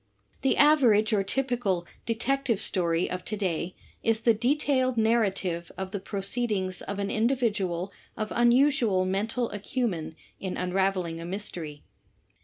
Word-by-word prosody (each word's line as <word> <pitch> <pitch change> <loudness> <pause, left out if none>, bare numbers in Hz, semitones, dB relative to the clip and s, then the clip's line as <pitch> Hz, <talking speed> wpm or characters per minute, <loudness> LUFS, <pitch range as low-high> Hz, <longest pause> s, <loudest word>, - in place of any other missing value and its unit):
The 270 - +2
average 240 -8 +5
or 205 - +3
typical 235 -6 -1 0.2
Detective 235 0 0
Story 175 -5 +1
of 180 0 -4
to 215 - -3
day 180 -2 -2 0.3
is 225 0 +1
the 230 0 +5
detailed 255 +1 +1
narrative 195 -7 +1
of 190 0 -4
the 200 - -3
proceedings 195 -1 -2
of 200 - -5
an 200 0 -2
individual 210 -7 0 0.3
of 215 -1 -3
unusual 240 -5 +4
mental 220 +6 -1
acumen 205 - -2 0.2
in 190 -2 -4
unraveling 180 -2 0
a - - -6
mystery. 175 -6 -5
205 Hz, 130 wpm, -27 LUFS, 185-240 Hz, 0.3 s, average